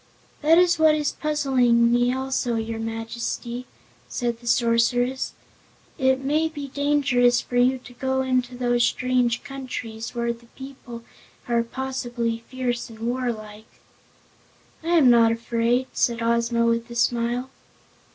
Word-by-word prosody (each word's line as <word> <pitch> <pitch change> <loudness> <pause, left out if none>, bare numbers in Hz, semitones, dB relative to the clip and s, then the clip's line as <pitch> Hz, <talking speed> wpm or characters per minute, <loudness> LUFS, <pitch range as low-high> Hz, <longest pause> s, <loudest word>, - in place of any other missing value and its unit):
"That 320 +2 +5
is 350 -2 +4
what 315 -1 +5
is 300 -1 0
puzzling 255 -6 +2
me 245 +1 +3
also, 260 -2 -1
your 225 0 -3
Majesty," 230 +2 -4 0.4
said 235 - -2
the 240 - -13
Sorceress. 245 +2 +1 0.7
"It 260 0 +2
may 305 +4 +1
be 290 -3 -7
dangerous 270 -4 +2
for 245 - -8
you 255 +2 +4
to 250 -1 -14
go 265 +1 -1
into 255 -1 -1
those 240 -1 +1
strange 250 -1 +1
countries, 250 -4 -6
where 235 0 0
the 235 0 -18
people 260 -3 -10 0.4
are 235 -1 +2
possibly 240 -2 -3
fierce 250 -2 -3
and 225 - -12
warlike." 225 -3 -4 1.2
"I 340 +1 +2
am 265 -6 +6
not 230 -1 +5
afraid," 235 +2 0
said 235 -1 0
Ozma, 235 0 +1
with 230 0 0
a 235 - -8
smile. 240 +2 0
245 Hz, 135 wpm, -24 LUFS, 235-265 Hz, 1.2 s, am